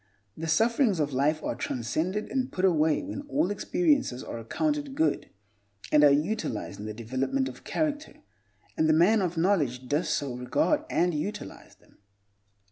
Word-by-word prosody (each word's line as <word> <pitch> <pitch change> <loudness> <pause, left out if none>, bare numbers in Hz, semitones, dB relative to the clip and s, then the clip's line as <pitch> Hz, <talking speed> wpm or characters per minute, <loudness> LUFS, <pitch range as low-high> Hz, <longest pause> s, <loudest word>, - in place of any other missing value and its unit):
The 165 - -5
sufferings 225 - +2
of 145 -2 0
life 150 +4 +1
are - - -1
transcended 155 - -2
and 260 -1 -1
put 185 - 0
away 160 - +2
when 285 -1 -5
all 290 -5 +1
experiences 275 - +1
are 115 - -6
accounted 290 - -2
good, 320 +2 0 0.6
and 150 0 +5
are 145 - +8
utilized 150 - -1
in 105 - -6
the 110 - -5
development 130 - -1
of - - -10
character, 300 -1 -2 0.6
and 160 - +2
the - - +5
man 190 +7 +4
of 175 -2 -2
knowledge 145 -9 +1
does 150 +5 0
so 140 -4 -1
regard 205 - 0
and 175 0 +1
utilize 195 +8 -6
them. - - -27
170 Hz, 160 wpm, -27 LUFS, -, 0.6 s, are